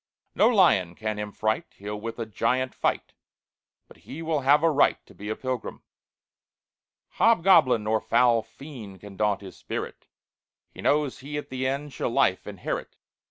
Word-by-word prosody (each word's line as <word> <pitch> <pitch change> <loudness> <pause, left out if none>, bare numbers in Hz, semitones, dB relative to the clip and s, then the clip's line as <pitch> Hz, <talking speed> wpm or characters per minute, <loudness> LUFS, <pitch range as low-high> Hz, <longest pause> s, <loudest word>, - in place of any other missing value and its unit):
No 215 - +4
lion 135 - +3
can 110 +1 -3
him 105 0 -4
fright; 110 +1 -2
He'll 105 +1 -6
with 115 +1 -5
a 115 - -3
giant 130 +4 -1
fight, - - -1 0.7
But - - -17
he 160 +4 -9
will 160 -2 0
have 140 +3 +4
a 165 - +4
right 145 -1 +3
To - - -17
be 105 +1 -8
a 110 - -1
pilgrim. 130 -2 -5 1.4
"Hobgoblin 170 - +5
nor 110 +1 +1
foul 120 -2 +3
fiend 110 - -11
Can 100 -1 -11
daunt 105 0 0
his 95 -2 -10
spirit; - - -6 0.6
He - - -11
knows 145 -2 +1
he 145 +2 -6
at 145 - -6
the 130 0 -2
end 140 +1 -3
Shall - - -2
life - - +1
inherit. - - -5
125 Hz, 165 wpm, -26 LUFS, 105-145 Hz, 1.4 s, Hobgoblin